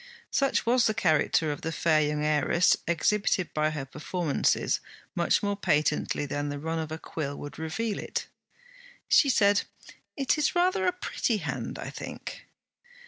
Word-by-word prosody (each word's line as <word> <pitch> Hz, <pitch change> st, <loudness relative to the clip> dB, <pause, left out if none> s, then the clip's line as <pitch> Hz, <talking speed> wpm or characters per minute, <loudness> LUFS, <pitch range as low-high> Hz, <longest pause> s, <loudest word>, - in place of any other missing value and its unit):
Such 275 Hz, -1 st, +1 dB
was 240 Hz, +1 st, +4 dB
the 215 Hz, -, 0 dB
character 160 Hz, -5 st, +2 dB
of 145 Hz, -, -5 dB
the 160 Hz, -, -3 dB
fair 160 Hz, -1 st, +2 dB
young 150 Hz, 0 st, 0 dB
heiress, 155 Hz, +4 st, +3 dB
exhibited 185 Hz, +1 st, +1 dB
by 155 Hz, 0 st, +1 dB
her 150 Hz, -3 st, -4 dB
performances 150 Hz, +3 st, 0 dB, 0.3 s
much -, -, +1 dB
more 205 Hz, 0 st, 0 dB
patently 150 Hz, -5 st, +1 dB
than 145 Hz, +1 st, -3 dB
the 145 Hz, -, -4 dB
run 160 Hz, +3 st, -3 dB
of 155 Hz, -1 st, -4 dB
a 160 Hz, -, -3 dB
quill 145 Hz, -3 st, -5 dB
would 145 Hz, -, -8 dB
reveal 200 Hz, +7 st, -2 dB
it. -, -, -3 dB, 0.8 s
She 280 Hz, -, +5 dB
said, 205 Hz, -5 st, +4 dB, 0.6 s
'It 275 Hz, +2 st, +1 dB
is 300 Hz, -, +1 dB
rather 370 Hz, +2 st, +2 dB
a -, -, +4 dB
pretty 305 Hz, -10 st, -1 dB
hand, -, -, -4 dB
I -, -, -6 dB
think.' -, -, -8 dB
165 Hz, 160 wpm, -28 LUFS, 150-215 Hz, 0.8 s, She